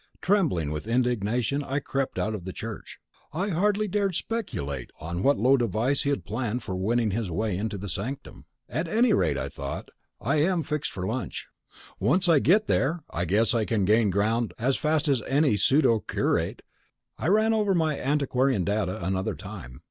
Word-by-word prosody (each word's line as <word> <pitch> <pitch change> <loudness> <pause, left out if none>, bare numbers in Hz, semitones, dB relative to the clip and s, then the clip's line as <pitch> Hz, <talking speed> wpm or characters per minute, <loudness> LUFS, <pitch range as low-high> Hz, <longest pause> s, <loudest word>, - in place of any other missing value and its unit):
Trembling 160 - +1
with 75 +6 -5
indignation, 120 +3 0
I 135 0 -2
crept 135 -1 -3
out 110 - -1
of 105 -5 -5
the 95 - -5
church. - - -7 0.4
I 185 +6 -1
hardly 205 +4 +1
dared 200 -2 0
speculate 70 - -3
on 85 +3 -4
what 140 +6 +3
low 130 +4 +4
device 120 +3 0
he 140 - -1
had 140 - -1
planned 115 +2 -2
for 95 - -4
winning 110 +4 +1
his 110 -1 -2
way 105 +3 -1
into 105 +2 -3
the 100 +2 -6
sanctum. 115 +9 -5 0.2
At 165 +3 -2
any 225 +5 +3
rate, 70 - +2
I 70 0 -2
thought, - - -6 0.3
I 140 +6 0
am 170 +2 +2
fixed 150 -1 -2
for 90 -2 -4
lunch: 120 +5 -4 0.5
once 160 - +2
I 165 -4 +6
get 205 +10 +4
there, 160 +1 0
I 85 - -1
guess 105 +8 +2
I 115 -2 +2
can 105 -3 0
gain 105 +1 +4
ground 105 +1 0
as 130 +3 +1
fast 155 0 +1
as 135 -5 +2
any 140 -4 +3
pseudo 115 +3 +3
curate. - - -1 0.6
I - - -1
ran 215 +4 +4
over 210 -3 +2
my 160 -3 +1
antiquarian 135 -6 +1
data 95 -3 -1
another 95 +1 -1
time. 60 +1 -9
125 Hz, 185 wpm, -26 LUFS, 100-155 Hz, 0.6 s, I